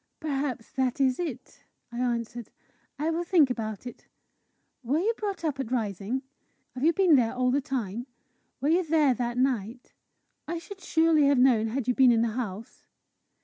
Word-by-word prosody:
"Perhaps 275 -6 -3
that 260 0 -1
is 260 -2 +2
it," 280 -3 -6 0.3
I 235 - -6
answered. 235 -2 -2 0.5
"I 310 +4 0
will 335 +2 -1
think 335 -7 +4
about 220 -3 -4
it. 245 - -10 0.8
Were 260 +5 0
you 415 +8 +1
brought 400 -6 -4
up 290 -3 -2
at 255 -3 -4
Rising? 220 +2 -2 0.5
Have 255 - -6
you 325 - +5
been 350 -2 +4
there 240 -2 +2
all 250 0 +1
the 280 +2 +1
time? 245 -4 -4 0.5
Were 285 - +1
you 350 +3 +3
there 305 -4 +3
that 240 -1 -3
night? 245 -2 -1 0.5
I 340 +2 -3
should 375 +4 -10
surely 320 -3 +3
have 280 -1 +4
known 245 -4 +4
had 245 +2 -3
you 250 - +3
been 255 -1 +5
in 230 -1 +3
the 235 - +1
house!" 220 -2 -6
260 Hz, 180 wpm, -27 LUFS, 235-305 Hz, 0.8 s, you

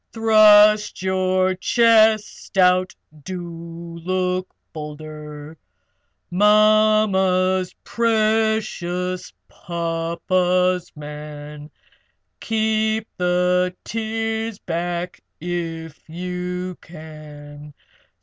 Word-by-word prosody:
Thrust 215 -2 +5
your 185 0 +1
chest 220 0 +2
out! 185 0 +3 0.3
Do 170 -1 -8
look 185 0 -1 0.2
bolder! 150 0 -9 0.7
Mamma's 205 -2 +3
precious 215 -5 0 0.2
papa's 175 +2 -1
man 150 0 -9 0.7
Keep 220 0 0
the 180 0 +1
tears 225 0 -3
back 175 0 -4 0.2
if 165 -2 -6
you 180 +1 -5
can. 150 -2 -12
180 Hz, 60 wpm, -21 LUFS, 165-215 Hz, 0.7 s, Thrust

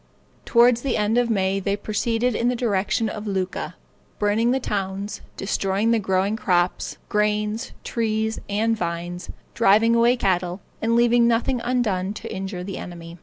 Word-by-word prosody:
Toward 240 0 +5
the 255 +1 -1
end 215 +3 +2
of 240 -1 +1
May 195 -2 +1
they 200 +1 0
proceeded 225 +3 0
in 235 +3 0
the 250 - +2
direction 220 -1 0
of 210 0 -5
Lucca, 185 -3 -3 0.4
burning 210 +3 +2
the 260 +2 +2
towns, 200 -3 -3 0.2
destroying 195 +2 0
the 230 - +3
growing 190 +1 +1
crops, 180 -4 0
grain, 210 +1 0 0.2
trees, 220 -1 -1
and 220 +3 +1
vines, 175 -1 -4 0.2
driving 225 +1 +4
away 235 +1 +5
the - - -3
cattle, 180 -1 +1 0.2
and 230 +1 +2
leaving 235 0 +4
nothing 240 +2 +1
undone 210 -6 0
to - - -7
injure 190 -1 -4
the 195 +1 -5
enemy. 170 -1 -9
210 Hz, 160 wpm, -23 LUFS, 190-230 Hz, 0.4 s, Toward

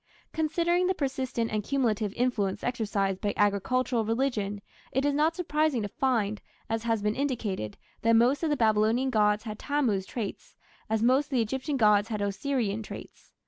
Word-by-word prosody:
Considering 340 +3 +1
the 375 - +1
persistent 260 -5 -2
and 215 -1 -1
cumulative 225 -5 0
influence 210 -5 0
exercised 205 -6 -1
by 205 - -1
agricultural 225 +4 +1
religion 220 -3 -1 0.3
it 265 +2 0
is 290 - +2
not 310 +3 +2
surprising 305 -8 0
to - - -2
find, 215 -3 0 0.3
as 225 0 0
has 225 -2 0
been 210 0 +1
indicated, 220 - -2 0.2
that 230 +1 +3
most 245 +5 +4
of 325 - 0
the 295 - +1
Babylonian 225 +3 +2
gods 210 -2 +2
had 215 -2 -6
Tammuz 245 -10 0
traits, 220 -5 -6 0.3
as 220 0 +1
most 260 +4 +4
of - - -26
the 250 - +3
Egyptian 265 +5 -2
gods 210 -3 +4
had 215 -2 -3
Osirian 210 +1 -1
traits. 215 - -10
230 Hz, 170 wpm, -28 LUFS, 210-270 Hz, 0.3 s, most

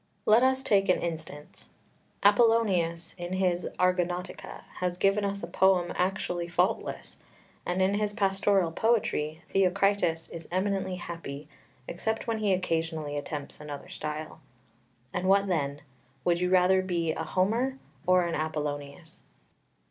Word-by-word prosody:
Let 220 +3 +6
us 260 +1 +2
take 195 -6 +2
an 180 - +4
instance: 155 -3 -6 0.5
Apollonius 205 -6 +3
in 175 +1 -4
his 180 -2 0
Argonautica 180 0 -1
has 180 -1 -2
given 195 +2 +2
us 200 -1 -2
a - - -3
poem 180 0 +3
actually 180 -2 -1
faultless; 175 +2 -1 0.5
and 180 +1 +1
in 190 +1 +2
his 210 0 0
pastoral 195 -3 +2
poetry 165 -7 0
Theocritus 195 -3 +2
is 165 -1 -9
eminently 190 0 -1
happy, 165 -5 -7 0.4
except 220 +8 -2
when 225 -2 -1
he 210 -2 +1
occasionally 160 -4 -1
attempts 145 0 -6
another 145 -2 -8
style. 155 0 -6 0.7
And 185 +1 -1
what 200 +1 +5
then? 145 -6 -1 0.4
Would 175 0 +2
you 180 - +1
rather 185 +1 +4
be 170 -3 -1
a 160 - -3
Homer 230 +10 0 0.3
or 185 -1 +5
an 170 - -2
Apollonius? 150 0 -4
180 Hz, 135 wpm, -28 LUFS, 165-195 Hz, 0.7 s, Let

